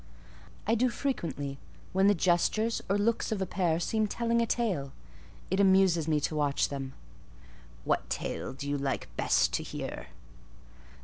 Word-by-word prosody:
"I 220 Hz, -, +2 dB
do 245 Hz, +2 st, +3 dB
frequently; 165 Hz, -, -3 dB, 0.3 s
when 190 Hz, +1 st, +4 dB
the 205 Hz, -, +5 dB
gestures 190 Hz, +6 st, +2 dB
or 200 Hz, -, +3 dB
looks 225 Hz, +3 st, +1 dB
of 215 Hz, -, 0 dB
a 190 Hz, -, 0 dB
pair 175 Hz, -3 st, 0 dB
seem 215 Hz, +4 st, 0 dB
telling 235 Hz, +2 st, +1 dB
a 230 Hz, -, +1 dB
tale: 185 Hz, -, -1 dB, 0.6 s
it 190 Hz, -, +1 dB
amuses 190 Hz, -4 st, +4 dB
me 155 Hz, -2 st, +2 dB
to 155 Hz, -, -1 dB
watch 145 Hz, -2 st, +1 dB
them." 135 Hz, -2 st, -5 dB, 0.9 s
"What -, -, 0 dB
tale -, -, -3 dB
do 140 Hz, +2 st, -6 dB
you 145 Hz, 0 st, -1 dB
like 135 Hz, -1 st, -3 dB
best -, -, +2 dB
to -, -, 0 dB
hear?" -, -, -6 dB
190 Hz, 160 wpm, -30 LUFS, 145-220 Hz, 0.9 s, the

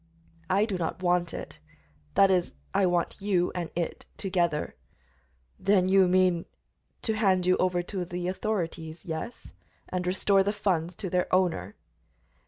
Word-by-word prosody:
"I 195 Hz, +3 st, +3 dB
do 195 Hz, -5 st, -3 dB
not 170 Hz, +2 st, -3 dB
want 175 Hz, -1 st, +2 dB
it; -, -, -7 dB, 0.6 s
that 195 Hz, -1 st, +6 dB
is, 180 Hz, -2 st, +1 dB, 0.2 s
I 195 Hz, -1 st, +3 dB
want 175 Hz, -1 st, 0 dB
you 185 Hz, -3 st, +1 dB
and 175 Hz, -2 st, -3 dB
it 170 Hz, -1 st, -3 dB
together." 175 Hz, -6 st, 0 dB, 0.9 s
"Then 190 Hz, -2 st, +3 dB
you 190 Hz, -1 st, +6 dB
mean 180 Hz, -2 st, +3 dB, 0.3 s
" -, -, -46 dB
"To 220 Hz, -, +1 dB
hand 190 Hz, -4 st, +2 dB
you 185 Hz, 0 st, +4 dB
over 180 Hz, -1 st, +1 dB
to 185 Hz, 0 st, -4 dB
the 175 Hz, 0 st, -4 dB
authorities, 170 Hz, -5 st, -3 dB
yes, 165 Hz, +8 st, -6 dB, 0.4 s
and 180 Hz, -1 st, -2 dB
restore 195 Hz, +2 st, +3 dB
the 200 Hz, +2 st, 0 dB
funds 180 Hz, -5 st, -1 dB
to 190 Hz, -, -5 dB
their 180 Hz, 0 st, 0 dB
owner." 175 Hz, -, +1 dB
180 Hz, 155 wpm, -28 LUFS, 175-195 Hz, 0.9 s, that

